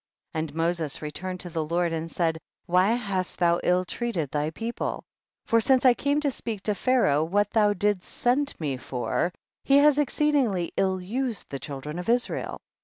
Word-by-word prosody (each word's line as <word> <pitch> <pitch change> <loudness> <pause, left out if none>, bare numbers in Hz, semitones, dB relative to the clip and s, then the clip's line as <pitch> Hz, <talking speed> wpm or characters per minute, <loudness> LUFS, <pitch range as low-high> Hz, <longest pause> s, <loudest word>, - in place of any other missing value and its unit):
54. 160 - -1
And 155 -1 -4
Moses 165 -2 -1
returned 180 +5 -5
to 175 - -6
the 160 -1 -1
Lord 170 +2 0
and 165 0 -3
said, 165 -1 0 0.3
why 185 +5 +3
hast 200 -6 -2
thou 170 -1 +3
ill 180 +1 +2
treat 235 +2 -3
ed 150 -4 -1
thy 150 +1 0
people? 225 +9 -4 0.4
for 230 0 +3
since 260 +3 +3
I 250 - +8
came 285 +4 0
to 285 -2 +1
speak 220 -5 -5
to 210 - +1
Pharaoh 205 - +2
what 205 +5 +1
thou 210 -2 +4
didst 205 -1 0
send 275 +4 0
me 145 -5 -2
for, 125 +7 -2 0.3
he 275 - +5
has 295 0 +5
exceedingly 275 - +1
ill 190 -1 +1
used 230 +4 -3
the 140 - -4
children 150 +4 -6
of 180 - -5
Israel. 245 +1 -1
185 Hz, 185 wpm, -26 LUFS, 165-240 Hz, 0.4 s, I